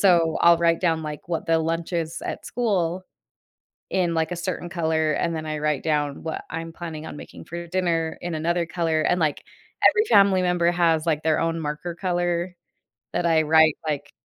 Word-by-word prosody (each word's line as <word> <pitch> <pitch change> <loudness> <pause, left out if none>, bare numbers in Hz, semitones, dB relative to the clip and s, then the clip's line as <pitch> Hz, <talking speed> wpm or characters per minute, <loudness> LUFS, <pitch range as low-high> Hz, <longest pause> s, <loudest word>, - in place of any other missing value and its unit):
so 170 -4 +4
I'll 170 0 +7
write 165 -1 +2
down, 165 -3 +1
like, 150 +2 -7
what 165 - -2
the 165 0 +3
lunch 165 +2 -2
is 165 -1 -3
at - - -5
school, 185 -6 -1 0.9
in, 180 -3 +1
like, 160 +1 0
a - - -3
certain 175 0 -4
color, 160 -3 0
and 165 +2 -1
then 155 0 -4
I 155 0 -3
write 150 -2 0
down 150 -3 -1
what 160 - -4
I'm 165 0 -5
planning 160 -2 -7
on - - -7
making - - -11
for 170 0 -6
dinner 165 -3 -1
in 175 -2 -4
another 170 +2 0
color, 165 -2 0
and, 180 - +2
like, 155 -2 0 0.5
every 430 -1 +3
family 195 -2 +5
member 175 -1 +2
has, 170 -2 +2
like, 155 -2 +1
their 160 0 +2
own 165 0 0
marker 150 +3 -4
color 175 0 -1 0.6
that 175 0 0
I 165 -2 +4
write, 160 0 +5
like, 145 -1 -3
165 Hz, 195 wpm, -24 LUFS, 160-175 Hz, 0.9 s, I'll